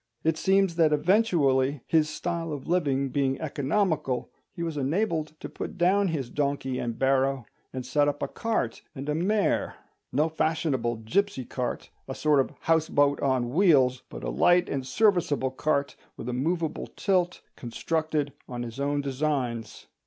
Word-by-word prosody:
It 160 0 +2
seems 190 0 +2
that 160 -2 +4
eventually, 150 - +2
his 155 -2 +2
style 165 +1 -3
of 145 -3 -6
living 140 -6 +1
being 135 0 0
economical, 150 -2 -1 0.2
he 170 - -5
was 165 -2 -3
enabled 155 +1 -1
to - - -6
put - - -7
down 190 +3 +3
his 145 -8 -3
donkey 140 -3 -1
and 115 -1 -3
barrow, 135 -1 +1 0.3
and 130 -1 -5
set 145 +3 +2
up 145 0 -1
a - - 0
cart 220 - -2
and 135 +2 -6
a 150 - +1
mare—no 175 -4 -1
fashionable 155 -7 0
gipsy 190 - 0
cart, 125 0 -4 0.2
a 135 - -5
sort 150 -2 +3
of 135 - +2
houseboat 145 -3 +2
on 130 -3 +1
wheels, 140 -7 +4
but - - -8
a - - -2
light 175 - +4
and 135 -2 -3
serviceable 165 -8 +2
cart, 140 +1 0 0.2
with - - -7
a 125 - -2
moveable 160 +5 -1
tilt, 180 -3 +1
constructed 150 +4 -2 0.2
on 120 -1 -4
his 115 +2 -7
own 145 +1 0
designs. 130 -5 -2
145 Hz, 155 wpm, -27 LUFS, 130-165 Hz, 0.3 s, that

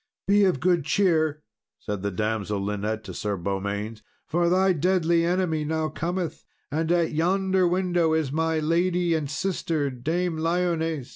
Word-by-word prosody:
"Be 200 0 +5
of 180 -8 +1
good 175 0 +2
cheer," 155 -2 +1 0.3
said 105 -2 -5
the 100 - -1
damsel 105 +1 -2
Linet 105 +2 -2
to 95 - -8
Sir 105 +1 -2
Beaumains, 100 +4 -3 0.2
"for 170 +2 +1
thy 185 +1 +3
deadly 170 0 +2
enemy 170 -3 0
now 160 +1 -1
cometh; 170 -1 -3 0.3
and 160 +3 0
at 170 -2 +2
yonder 185 +3 +2
window 175 -2 +1
is 160 -4 0
my 160 +1 0
lady 170 +2 +1
and 155 -3 -1
sister, 160 -4 -1
Dame 160 +7 -2
Lyones." 165 -4 0
160 Hz, 150 wpm, -25 LUFS, 135-175 Hz, 0.3 s, Be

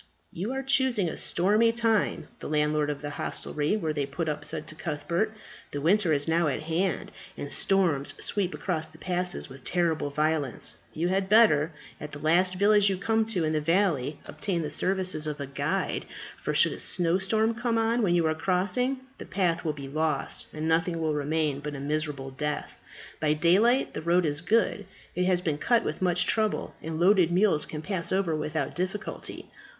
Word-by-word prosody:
"You 195 +8 -3
are 270 0 -3
choosing 260 -7 +2
a - - -4
stormy 210 +6 +2
time," 225 -3 +1
the - - -6
landlord 150 0 +1
of 145 0 -4
the 145 - -3
hostelry 150 +4 -2
where 160 -7 -2
they 145 -2 -1
put 160 +4 -3
up 150 -1 -2
said 150 - -4
to - - -8
Cuthbert. 170 +7 -2 0.4
"The 145 - -4
winter 175 +3 +3
is 145 0 +1
now 165 0 +2
at 145 +1 -2
hand, 165 +2 -1 0.3
and 145 - -5
storms 170 -8 +1
sweep 195 -3 -1
across 160 -4 -2
the 160 0 -16
passes 180 +1 -2
with 135 -1 -13
terrible 165 -4 0
violence. 150 -2 0
You 170 +3 -1
had 190 +1 0
better, 190 -8 +5 0.3
at 150 - -8
the - - -6
last 175 +5 +2
village 205 +1 +4
you 190 - -1
come 220 +3 +1
to 185 -7 0
in 155 0 0
the 155 - +1
valley, 155 -5 +1
obtain 170 +3 -2
the 150 - -4
services 185 -2 +1
of 150 -1 -4
a 140 - -3
guide, 140 +1 -2 0.4
for - - -2
should - - +5
a - - -8
snowstorm 195 +6 +1
come 235 0 -1
on 225 +2 +2
when 180 -5 +2
you 170 -2 +2
are 160 - +2
crossing, 200 +11 0 0.2
the - - -7
path 175 -3 0
will 160 - 0
be 140 -2 -8
lost, 155 0 -2
and 155 +1 -4
nothing 165 +1 +1
will 160 -1 0
remain 150 -1 0
but 150 0 -5
a - - -6
miserable 145 -2 -2
death. 150 +2 -4 0.4
By 150 -1 +2
daylight 200 - +3
the - - -4
road 170 +2 +2
is 145 0 -1
good. 205 0 +1 0.3
It 180 +1 +1
has 180 -1 +2
been 155 -4 -1
cut 240 +6 +3
with 155 - -4
much 180 -1 +2
trouble, 215 -2 0
and 160 0 -4
loaded 180 -1 +4
mules 185 -3 +2
can 150 0 -6
pass 185 -3 -3
over 185 -4 +1
without 150 -2 -2
difficulty. 185 +4 -4
170 Hz, 195 wpm, -27 LUFS, 150-195 Hz, 0.4 s, better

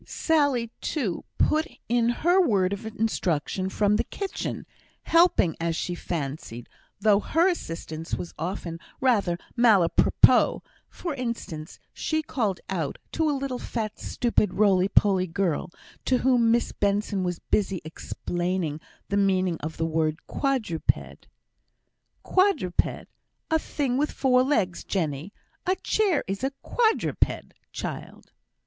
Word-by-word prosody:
Sally, 285 -8 +1
too, 230 - -2
put 310 +1 +2 0.2
in 235 0 +2
her 350 +10 +3
word 200 - +2
of 210 +3 -5
instruction 190 -5 -1
from 205 +1 +2
the - - +1
kitchen, 395 -2 -5 0.4
helping, 330 - +4
as 165 0 -1
she 175 - -2
fancied, 140 -8 -5 0.3
though 205 -1 +4
her 330 - +2
assistance 165 - -3
was 175 - -6
often 170 -1 -4 0.2
rather 205 -9 +2 0.2
malapropos; 215 -8 +4 0.3
for 345 -4 -5
instance, 235 - -5 0.2
she 315 0 -1
called 215 -10 -1
out, 165 -7 -2
to 320 -1 +1
a 290 - 0
little 265 -2 -3
fat, 220 -2 -4
stupid, 220 -5 0
roly 195 -2 +4
poly 195 -2 +3
girl, 175 -2 -1 0.4
to 255 - +3
whom 245 -3 +3
Miss 235 +1 +2
Benson 200 -1 0
was 180 -1 -1
busy 195 -1 0
explaining 175 0 -3 0.3
the 200 - +1
meaning 185 -3 +2
of 155 +1 -6
the 165 - 0
word 160 0 -1
quadruped, 250 - -1 1.0
"Quadruped, 370 - +1 0.5
a 320 - +4
thing 270 -5 -1
wi' 295 +2 +2
four 255 -3 +3
legs, 215 -10 0
Jenny; 160 -1 -2 0.4
a 370 - +3
chair 380 -2 +1
is 195 +5 -4
a 270 +1 0
quadruped, 450 -2 0 0.2
child!" - - -7
205 Hz, 130 wpm, -26 LUFS, 175-265 Hz, 1.0 s, helping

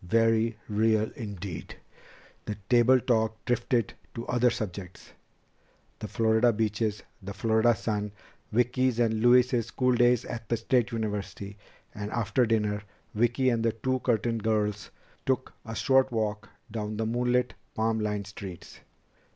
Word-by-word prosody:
Very 115 +2 +2
real 110 0 +2
indeed!" 100 - -6 0.7
The 105 - -3
table 125 +1 +5
talk 110 -2 0
drifted 120 -2 0 0.2
to 115 - -5
other 125 0 +3
subjects 100 -6 -6 0.9
the 105 - -5
Florida 110 +3 +3
beaches, 105 -1 -1 0.2
the 100 +1 -7
Florida 110 +2 +3
sun, 105 -2 -2 0.4
Vicki's 125 +1 +2
and 110 -2 +2
Louise's 120 -1 +4
school 125 +1 +1
days 120 -1 +3
at 115 -2 -7
State 120 +1 +1
University. 105 -2 -4 0.4
And 105 0 -5
after 115 +2 +1
dinner, 105 -2 +1 0.3
Vicki 120 +4 +2
and 115 -1 0
the 115 -1 +2
two 130 +3 -1
Curtin 115 -1 0
girls 105 -1 -1 0.4
took 130 -1 0
a 115 0 -6
short 135 +1 +3
walk 110 -2 -2 0.2
along 105 -1 -3
the 110 - -1
moonlit, 125 +1 +1 0.2
palm 110 0 +1
lined 105 -1 -2
streets. 95 -2 -9
115 Hz, 135 wpm, -28 LUFS, 105-120 Hz, 0.9 s, table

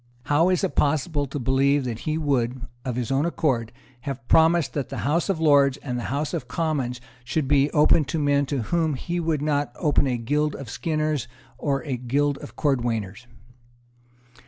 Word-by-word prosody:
How 155 +6 +3
is 185 +1 +1
it 190 - 0
possible 145 0 +1
to 135 - -5
believe 135 +2 +2
that 115 -3 -4
he 155 - 0
would, 130 -5 0 0.2
of 125 -2 -3
his 125 0 -2
own 135 +2 +2
accord, 135 -9 0 0.3
have 135 -2 -6
promised 165 0 +4
that 140 -3 -3
the - - -5
House 165 +6 +1
of 190 -5 0
Lords 140 -4 +4
and 125 -3 -5
the - - -5
House 145 +3 -2
of 125 - -3
Commons 135 -5 -2 0.2
should 135 +3 -1
be 140 +1 +3
open 150 +1 +4
to 135 +5 -3
men 145 -2 +2
to 135 -4 -2
whom 160 +3 0
he 175 +6 -3
would 160 -3 -1
not 145 -1 0
open 150 -4 +1
a 125 -2 0
guild 145 +6 0
of 135 -5 -8
skinners 155 -5 -1 0.3
or 140 -2 -1
a 135 -5 -3
guild 140 +4 0
of 120 - -10
cordwainers? 120 -6 -1
145 Hz, 185 wpm, -24 LUFS, 125-155 Hz, 0.3 s, promised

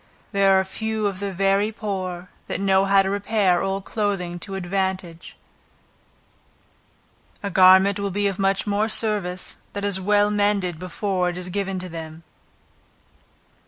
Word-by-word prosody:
There 195 -2 +4
are - - +1
few 220 +2 -3
of 195 -2 -2
the 200 -1 -3
very 195 +3 +1
poor, 185 -4 -5 0.2
that - - -3
know 195 0 +3
how 195 0 +4
to 190 - -2
repair 200 -3 +1
old 195 0 -2
clothing 195 -5 -2
to 195 +2 -5
advantage; 190 -2 -3 2.1
a 200 - -3
garment 190 +2 +6
will 200 0 -1
be 205 +2 -1
of 195 -1 -3
much 195 0 +1
more 210 +1 0
service, 205 -5 -1 0.2
that 200 0 -3
is 195 -2 0
well 205 +1 +3
mended 205 -5 0
before 185 0 -1
it 175 - -5
is 180 0 -4
given 195 0 -2
to 185 0 -5
them. 160 -1 -8
195 Hz, 150 wpm, -23 LUFS, 185-205 Hz, 2.1 s, garment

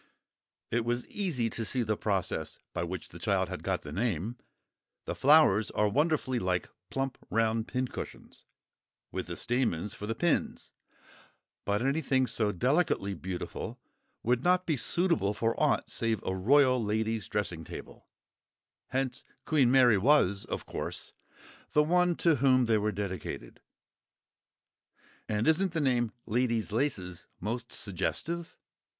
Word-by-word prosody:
It 115 0 +1
was 120 +1 -2
easy 160 - 0
to 115 - -3
see 120 +3 0
the 110 -1 0
process 100 -3 -2 0.2
by - - -1
which 85 0 -5
the - - -11
child - - +1
had - - -5
got - - -1
the 75 - -8
name—the 110 +3 -5
flowers 135 -8 +5
are 105 - +1
wonderfully 140 +1 +1
like 90 -2 -1 0.2
plump 135 -1 -3
round 110 0 +1
pincushions, 130 0 -5 0.7
with - - -4
the - - -5
stamens 110 -6 -1
for 105 - -7
the 115 - -1
pins: 170 +5 -1 0.9
but 105 +3 0
anything 135 -2 +2
so 110 -4 +1
delicately 125 - +1
beautiful 90 0 -5 0.4
would 125 +1 +1
not 180 +1 +3
be 160 - +1
suitable 160 - +1
for 115 +2 +1
aught - - +2
save 115 -2 0
a 95 - -2
royal 130 +5 +4
lady's 110 +1 -1
dressing 100 -6 -2
table; - - -10 0.8
hence 130 -1 -2 0.2
Queen 140 -6 +3
Mary 125 -5 +6
was, 100 -5 +3
of - - -4
course, - - -4 0.6
the 150 - +5
one 180 +2 +3
to 165 -3 +3
whom 130 -1 +4
they 110 -2 +3
were 105 +1 0
dedicated. 95 -4 -5 1.7
And 105 +3 0
isn't 175 +3 +3
the 165 - 0
name 125 -5 +1
"Lady's 115 -1 0
Laces" 100 - -2
most 115 +6 -4
suggestive? 160 - -3
120 Hz, 135 wpm, -30 LUFS, 105-135 Hz, 1.7 s, Mary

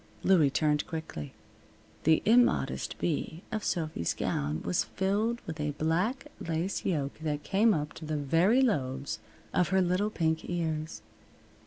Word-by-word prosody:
Louie 170 -7 +5
turned 150 +1 +1
quickly. 120 - -5 0.7
The 160 0 +4
immodest 240 +3 +3
V 160 +1 -2
of 215 -1 -2
Sophy's 155 - -1
gown 75 +2 -1
was 180 - +1
filled 210 +5 0
with 160 -1 -6
a 150 -1 -1
black 180 - 0
lace 165 +4 -2
yoke 145 -7 -1
that 150 -2 -2
came 215 +4 +3
up 150 -5 -1
to 160 - -9
the 155 0 -2
very 170 - +3
lobes 135 - -1 0.3
of 180 - +2
her 190 +1 +3
little 185 +3 +2
pink 160 -5 -1
ears. 160 -2 -2
160 Hz, 145 wpm, -30 LUFS, 150-190 Hz, 0.7 s, Louie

